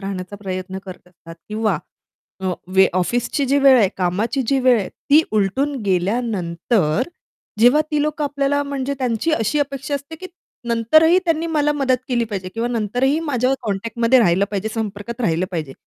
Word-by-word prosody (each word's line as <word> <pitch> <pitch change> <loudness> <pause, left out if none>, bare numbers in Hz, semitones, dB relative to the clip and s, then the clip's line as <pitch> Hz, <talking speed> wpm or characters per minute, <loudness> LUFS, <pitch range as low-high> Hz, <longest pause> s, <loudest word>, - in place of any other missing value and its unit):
राहण्याचा 195 0 -6
प्रयत्न 190 -1 -5
करत 185 -1 -11
असतात 165 -1 -14
किंवा 215 -5 0 0.6
अ, 185 -1 -1 0.2
वे 190 0 +6
ऑफिसची 240 +9 0
जी 285 - +4
वेळ 270 -2 +6
आहे 200 -4 +4
कामाची 195 +9 0
जी 275 - +3
वेळ 250 -2 +4
आहे 190 - -4 0.2
ती 305 +3 +7
उलटून 240 +8 0
गेल्यानंतर, 190 -1 0 0.6
जेव्हा 250 +6 +6
ती 300 -1 +1
लोकं 300 0 -1
आपल्याला 285 0 0
म्हणजे 280 -1 -3
त्यांची 250 +4 -1
अशी 230 +5 0
अपेक्षा 275 0 -3
असते 285 +3 -6
की 370 - -8 0.4
नंतरही 310 +10 +4
त्यांनी 330 0 0
मला 295 -2 +1
मदत 265 -3 +1
केली 240 -2 +1
पाहिजे 185 -2 -4
किंवा 230 +1 -1
नंतरही 245 +6 0
माझ्या 255 +1 +1
कॉन्टॅक्टमध्ये 230 +4 +1
राहिलं 190 -2 +3
पाहिजे 205 +1 -2
संपर्कात 220 +2 -5
राहिलं 180 -4 0
पाहिजे. 155 -7 -4
230 Hz, 165 wpm, -20 LUFS, 195-275 Hz, 0.6 s, ती